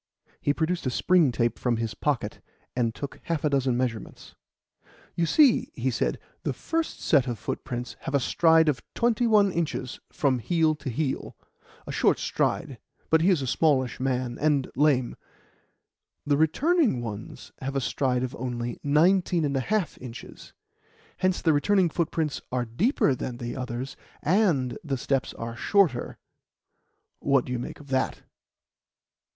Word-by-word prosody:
He 145 Hz, -, +2 dB
produced 160 Hz, 0 st, -1 dB
a -, -, +2 dB
spring 165 Hz, +2 st, +3 dB
tape 120 Hz, 0 st, 0 dB
from 120 Hz, -2 st, 0 dB
his 115 Hz, -1 st, -2 dB
pocket, 120 Hz, -8 st, -2 dB, 0.3 s
and 115 Hz, -3 st, 0 dB
took 140 Hz, -, -6 dB
half 165 Hz, -3 st, -2 dB
a 150 Hz, -, +1 dB
dozen 130 Hz, -3 st, +1 dB
measurements. 120 Hz, -4 st, -4 dB, 0.8 s
"You 170 Hz, -1 st, 0 dB
see," 280 Hz, -, +4 dB
he 130 Hz, +1 st, -1 dB
said, -, -, -1 dB, 0.2 s
"the -, -, -2 dB
first 330 Hz, 0 st, -3 dB
set 140 Hz, -4 st, +3 dB
of 120 Hz, -2 st, -2 dB
footprints 120 Hz, +4 st, -5 dB
have 135 Hz, -, -3 dB
a -, -, +4 dB
stride 160 Hz, +4 st, +4 dB
of 145 Hz, -4 st, +1 dB
twenty 240 Hz, 0 st, +2 dB
one 205 Hz, -3 st, +4 dB
inches 155 Hz, -7 st, -3 dB
from 135 Hz, -4 st, +1 dB
heel 160 Hz, +6 st, +2 dB
to 150 Hz, -2 st, -6 dB
heel 135 Hz, +3 st, -3 dB, 0.5 s
a -, -, -6 dB
short -, -, +3 dB
stride; -, -, -1 dB, 0.3 s
but 160 Hz, 0 st, +5 dB
he 175 Hz, -, +4 dB
is 170 Hz, -8 st, +2 dB
a -, -, -2 dB
smallish 130 Hz, -2 st, +1 dB
man, 125 Hz, -2 st, -1 dB
and 145 Hz, -3 st, +1 dB
lame; 130 Hz, -3 st, +2 dB, 1.1 s
the 145 Hz, -, +3 dB
returning 245 Hz, -, +2 dB
ones 110 Hz, -1 st, -7 dB
have 135 Hz, +1 st, -4 dB
a -, -, +2 dB
stride 130 Hz, -1 st, 0 dB
of 130 Hz, +2 st, -4 dB
only 120 Hz, -1 st, -4 dB
nineteen 170 Hz, +3 st, +3 dB
and 140 Hz, -1 st, -1 dB
a -, -, +2 dB
half 205 Hz, -, -1 dB
inches; 120 Hz, -2 st, -10 dB, 0.7 s
hence 185 Hz, 0 st, 0 dB
the 160 Hz, -, +4 dB
returning 185 Hz, +4 st, +3 dB
footprints 160 Hz, -3 st, -1 dB
are 125 Hz, -1 st, 0 dB
deeper 145 Hz, -, +2 dB
than 125 Hz, -1 st, -5 dB
the 120 Hz, -1 st, -5 dB
others, 125 Hz, +1 st, -5 dB, 0.3 s
and 155 Hz, -, +2 dB
the 140 Hz, -4 st, -2 dB
steps 135 Hz, +1 st, -1 dB
are 115 Hz, 0 st, -6 dB
shorter. 160 Hz, -3 st, +1 dB, 1.0 s
What 140 Hz, -3 st, +2 dB
do -, -, -7 dB
you 125 Hz, -, -1 dB
make -, -, -6 dB
of 145 Hz, -2 st, -14 dB
that?" 130 Hz, 0 st, -1 dB
140 Hz, 160 wpm, -26 LUFS, 125-165 Hz, 1.1 s, but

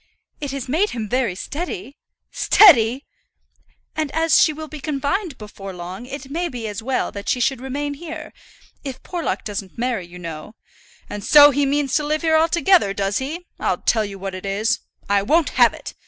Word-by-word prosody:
"It 285 Hz, -, -4 dB
has 270 Hz, -1 st, -5 dB
made 335 Hz, +11 st, +1 dB
him 220 Hz, -2 st, -3 dB
very 240 Hz, -4 st, 0 dB
steady." 335 Hz, -, -5 dB, 0.4 s
"Steady!" 260 Hz, -, +5 dB, 0.9 s
"And 310 Hz, -1 st, -1 dB
as 325 Hz, 0 st, +4 dB
she 315 Hz, -, +5 dB
will 310 Hz, +1 st, -7 dB
be 305 Hz, 0 st, -9 dB
confined 290 Hz, +3 st, -2 dB
before 195 Hz, -2 st, -9 dB
long 180 Hz, +6 st, -8 dB
it 275 Hz, 0 st, -8 dB
may 345 Hz, +3 st, -1 dB
be 240 Hz, -5 st, -5 dB
as 210 Hz, +1 st, -5 dB
well 255 Hz, +3 st, -1 dB
that 200 Hz, 0 st, -6 dB
she 255 Hz, -, +1 dB
should 250 Hz, +1 st, 0 dB
remain 285 Hz, +2 st, -3 dB
here. 310 Hz, +1 st, -8 dB, 0.5 s
If 270 Hz, -3 st, -7 dB
Porlock 350 Hz, -3 st, -3 dB
doesn't 200 Hz, -3 st, -6 dB
marry, 230 Hz, -7 st, -2 dB
you 175 Hz, +1 st, -12 dB
know 170 Hz, +4 st, -8 dB, 0.3 s
" -, -, -28 dB
"And 205 Hz, -1 st, -6 dB
so 290 Hz, +4 st, +8 dB
he 280 Hz, 0 st, +1 dB
means 280 Hz, -1 st, 0 dB
to 300 Hz, -, -1 dB
live 305 Hz, +2 st, -1 dB
here 320 Hz, -1 st, +3 dB
altogether, 330 Hz, -, +3 dB
does 200 Hz, 0 st, 0 dB
he? 315 Hz, +7 st, -5 dB
I'll -, -, 0 dB
tell 220 Hz, -2 st, +2 dB
you 200 Hz, -1 st, -6 dB
what 195 Hz, 0 st, -5 dB
it 185 Hz, -, -7 dB
is, 200 Hz, +3 st, 0 dB, 0.3 s
I 200 Hz, 0 st, +3 dB
won't 310 Hz, +10 st, +2 dB
have -, -, +5 dB
it. -, -, -9 dB
270 Hz, 195 wpm, -21 LUFS, 205-310 Hz, 0.9 s, so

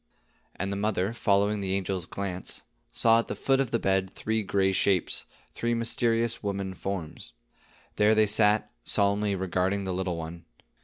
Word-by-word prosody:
And 95 Hz, +2 st, -3 dB
the -, -, -2 dB
mother, 100 Hz, 0 st, 0 dB
following 105 Hz, -2 st, +2 dB
the 95 Hz, -1 st, 0 dB
angel's 95 Hz, -2 st, -3 dB
glance, 95 Hz, -2 st, -4 dB, 0.3 s
saw 115 Hz, -1 st, +4 dB
at 115 Hz, -, -2 dB
the -, -, -4 dB
foot 135 Hz, 0 st, +1 dB
of 135 Hz, -3 st, +1 dB
the 115 Hz, -, +1 dB
bed 95 Hz, -2 st, +1 dB
three 110 Hz, +3 st, -2 dB
gray 95 Hz, -1 st, +1 dB
shapes, 95 Hz, -2 st, +1 dB, 0.3 s
three 120 Hz, 0 st, -1 dB
mysterious 115 Hz, 0 st, 0 dB
woman 100 Hz, -2 st, -3 dB
forms. 95 Hz, -10 st, -6 dB, 0.6 s
There 105 Hz, +1 st, +4 dB
they 110 Hz, 0 st, +5 dB
sat, 105 Hz, 0 st, +3 dB
solemnly 100 Hz, 0 st, +2 dB
regarding 95 Hz, +1 st, 0 dB
the 95 Hz, -1 st, -2 dB
little 90 Hz, -2 st, -2 dB
one. 85 Hz, +1 st, -7 dB
100 Hz, 160 wpm, -27 LUFS, 95-110 Hz, 0.6 s, they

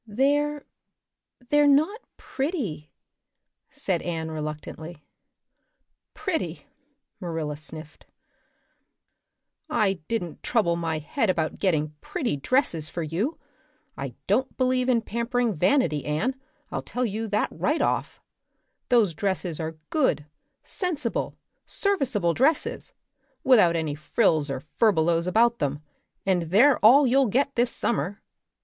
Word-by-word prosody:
"They're 290 Hz, +6 st, +1 dB, 0.8 s
they're 295 Hz, 0 st, +5 dB
not 315 Hz, -, +3 dB, 0.2 s
pretty," 255 Hz, -, -4 dB, 0.8 s
said -, -, -2 dB
Anne 160 Hz, -2 st, -3 dB
reluctantly. 155 Hz, +1 st, -6 dB, 1.1 s
"Pretty!" 315 Hz, -, -3 dB, 0.5 s
Marilla 165 Hz, -5 st, -3 dB
sniffed. 155 Hz, +1 st, -9 dB, 1.6 s
"I 195 Hz, -5 st, +1 dB
didn't 180 Hz, -9 st, -3 dB
trouble 210 Hz, -8 st, +1 dB
my 165 Hz, -2 st, -2 dB
head 195 Hz, -, -1 dB
about 165 Hz, -4 st, -1 dB
getting 155 Hz, -6 st, +1 dB
pretty -, -, -2 dB
dresses 160 Hz, -, +1 dB
for 170 Hz, -, -4 dB
you. 185 Hz, -, -2 dB, 0.6 s
I -, -, -6 dB
don't 260 Hz, 0 st, 0 dB
believe 255 Hz, 0 st, +2 dB
in 235 Hz, -3 st, +3 dB
pampering 235 Hz, 0 st, -1 dB
vanity, 180 Hz, -, +2 dB
Anne, 155 Hz, -, 0 dB, 0.4 s
I'll -, -, -2 dB
tell 250 Hz, 0 st, -2 dB
you 220 Hz, +1 st, -3 dB
that 210 Hz, 0 st, 0 dB
right 305 Hz, +2 st, 0 dB
off. -, -, -1 dB, 0.7 s
Those 225 Hz, -8 st, +4 dB
dresses 185 Hz, -2 st, -2 dB
are 160 Hz, 0 st, -4 dB
good, 260 Hz, -, +1 dB, 0.4 s
sensible, 305 Hz, -, -2 dB, 0.3 s
serviceable 260 Hz, -, 0 dB
dresses, 290 Hz, -, +1 dB, 0.5 s
without 210 Hz, -10 st, +5 dB
any 160 Hz, -3 st, -1 dB
frills 155 Hz, 0 st, +1 dB
or 135 Hz, -1 st, -3 dB
furbelows 170 Hz, -1 st, +2 dB
about 230 Hz, +5 st, +3 dB
them, 145 Hz, -1 st, -1 dB, 0.5 s
and 180 Hz, -4 st, +1 dB
they're 245 Hz, -, +5 dB
all 265 Hz, +7 st, +7 dB
you'll 265 Hz, +1 st, +4 dB
get 275 Hz, +6 st, +1 dB
this 240 Hz, -1 st, +2 dB
summer. 205 Hz, -4 st, -2 dB
205 Hz, 115 wpm, -25 LUFS, 160-255 Hz, 1.6 s, all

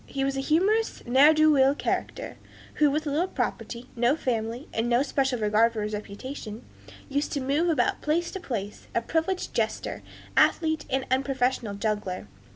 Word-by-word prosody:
He 270 Hz, 0 st, -2 dB
was 270 Hz, 0 st, 0 dB
a -, -, -1 dB
humorous, 390 Hz, +10 st, +1 dB
ne'er 270 Hz, +5 st, +6 dB
do 310 Hz, 0 st, +5 dB
weel 270 Hz, -1 st, +4 dB
character, -, -, -3 dB, 0.4 s
who, 300 Hz, -, +6 dB
with 305 Hz, +2 st, -1 dB
a 290 Hz, -, -1 dB
little 325 Hz, +6 st, +1 dB
property, 245 Hz, -8 st, -4 dB
no 240 Hz, +4 st, +3 dB
family, 235 Hz, -2 st, -2 dB
and 225 Hz, +1 st, 0 dB
no 240 Hz, +2 st, +3 dB
special 270 Hz, -3 st, 0 dB
regard 220 Hz, +1 st, +3 dB
for 215 Hz, -2 st, -2 dB
his 210 Hz, 0 st, -3 dB
reputation, 215 Hz, +2 st, -7 dB, 0.4 s
used 285 Hz, +1 st, -1 dB
to 285 Hz, -, 0 dB
move 285 Hz, +6 st, +1 dB
about 290 Hz, -7 st, +2 dB
from -, -, -26 dB
place 335 Hz, +3 st, +1 dB
to 385 Hz, -, -5 dB
place, 210 Hz, -, -5 dB
a 235 Hz, -, +3 dB
privileged 330 Hz, +7 st, -1 dB
jester, -, -, -2 dB, 0.3 s
athlete, 315 Hz, -2 st, +3 dB
and 265 Hz, -1 st, 0 dB
unprofessional 260 Hz, -5 st, 0 dB
juggler. 205 Hz, -3 st, -2 dB
270 Hz, 175 wpm, -27 LUFS, 230-305 Hz, 0.4 s, ne'er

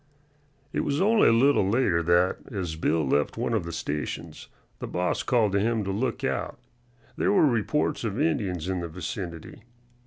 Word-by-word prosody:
It -, -, 0 dB
was 145 Hz, +1 st, 0 dB
only 215 Hz, +3 st, +4 dB
a -, -, +6 dB
little 115 Hz, -4 st, +3 dB
later 105 Hz, -7 st, +2 dB
that, 85 Hz, +2 st, +2 dB
as 90 Hz, -7 st, -3 dB
Bill 80 Hz, -2 st, 0 dB
left 70 Hz, +7 st, 0 dB
one 120 Hz, 0 st, -1 dB
of 105 Hz, -7 st, 0 dB
the 85 Hz, -, -5 dB
stations, 75 Hz, -2 st, -5 dB, 0.3 s
the -, -, -5 dB
boss 90 Hz, -1 st, -1 dB
called 115 Hz, -5 st, +2 dB
to 100 Hz, -, +2 dB
him 110 Hz, +1 st, 0 dB
to 95 Hz, -, -3 dB
look 110 Hz, +7 st, -2 dB
out, -, -, -2 dB, 0.6 s
there -, -, +2 dB
were 190 Hz, -5 st, +5 dB
reports 125 Hz, +2 st, 0 dB
of 110 Hz, +1 st, -2 dB
Indians 105 Hz, -, -1 dB
in 95 Hz, -1 st, -1 dB
the 85 Hz, -, -4 dB
vicinity. 85 Hz, +1 st, -7 dB
100 Hz, 180 wpm, -26 LUFS, 85-120 Hz, 0.6 s, a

